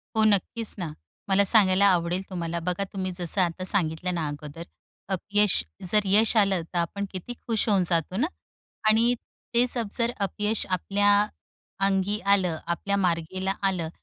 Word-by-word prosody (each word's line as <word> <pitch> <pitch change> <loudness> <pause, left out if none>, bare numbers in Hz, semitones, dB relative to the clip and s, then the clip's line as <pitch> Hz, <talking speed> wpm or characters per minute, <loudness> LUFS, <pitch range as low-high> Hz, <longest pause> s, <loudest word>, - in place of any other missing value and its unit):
हो. 220 - +3
नक्कीच 215 +2 +1
ना. 170 -4 -4 0.4
मला 195 +1 +4
सांगायला 195 -2 +6
आवडेल 180 -1 +2
तुम्हाला 170 -2 -3
बघा 180 +3 -2
तुम्ही 190 -1 -3
जसं 175 +2 +3
आता 180 +1 -1
सांगितलं 180 -2 0
ना 165 -2 -2
अगोदर. 145 +3 -7 0.5
अपयश 200 - +1 0.3
जर 210 - +4
यश 215 +4 +3
आलं 195 -4 +3
तर 175 - -2
आपण 200 +4 -2
किती 190 +6 -7
खुश 225 -1 0
होऊन 195 -3 +3
जातो 170 +2 -1
ना. 295 +7 +1 0.6
आणि 230 +3 +4 0.4
तेच 245 +1 +2 0.2
जर 235 0 +1
अपयश 210 +2 -2
आपल्या 200 +3 +1 0.7
अंगी 195 +2 0
आलं, 190 -4 +2
आपल्या 200 +4 -1
मार्गाला 185 +1 -1 0.2
आलं. 170 -4 -3
190 Hz, 150 wpm, -26 LUFS, 175-205 Hz, 0.7 s, सांगायला